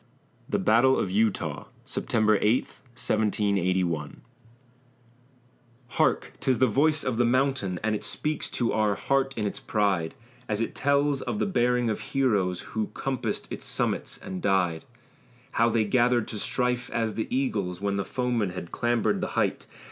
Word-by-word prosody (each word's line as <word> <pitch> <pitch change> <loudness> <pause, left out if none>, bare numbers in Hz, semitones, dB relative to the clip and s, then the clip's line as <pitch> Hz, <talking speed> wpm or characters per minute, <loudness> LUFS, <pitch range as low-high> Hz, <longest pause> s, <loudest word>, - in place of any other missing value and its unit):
THE - - +1
BATTLE 120 +5 +4
OF 95 - -1
EUTAW 105 +1 0 0.2
[September 110 -2 +1
8, 115 +5 +3 0.3
1781] 95 -8 0 1.7
Hark! - - +1
'tis 130 -2 +1
the 130 - +4
voice 145 +6 +2
of 120 -2 -1
the - - +5
mountain, 120 -7 +1
And 110 0 +1
it 105 - -3
speaks 155 0 -2
to 120 -2 0
our 105 -2 +2
heart 135 +4 0
in 105 - -1
its 100 - -3
pride, 100 -6 0 0.3
As 105 -1 0
it 115 - -2
tells 140 0 +1
of - - -3
the - - +1
bearing 125 -8 +2
of 110 - -3
heroes 105 -10 0
Who 110 -1 -1
compassed 135 -2 -3
its - - -6
summits - - -2
and 95 -1 -6
died! 90 -5 +1 0.7
How 115 +1 +3
they 115 -1 +2
gathered 120 +1 +2
to 105 - -5
strife 125 +2 -1
as 115 -2 -1
the 110 - -3
eagles, 100 -9 -1
When 100 0 -1
the 100 - 0
foeman 125 -5 -1
had 85 -2 -7
clambered 120 -1 +1
the - - -1
height! - - 0
110 Hz, 155 wpm, -27 LUFS, 100-125 Hz, 1.7 s, the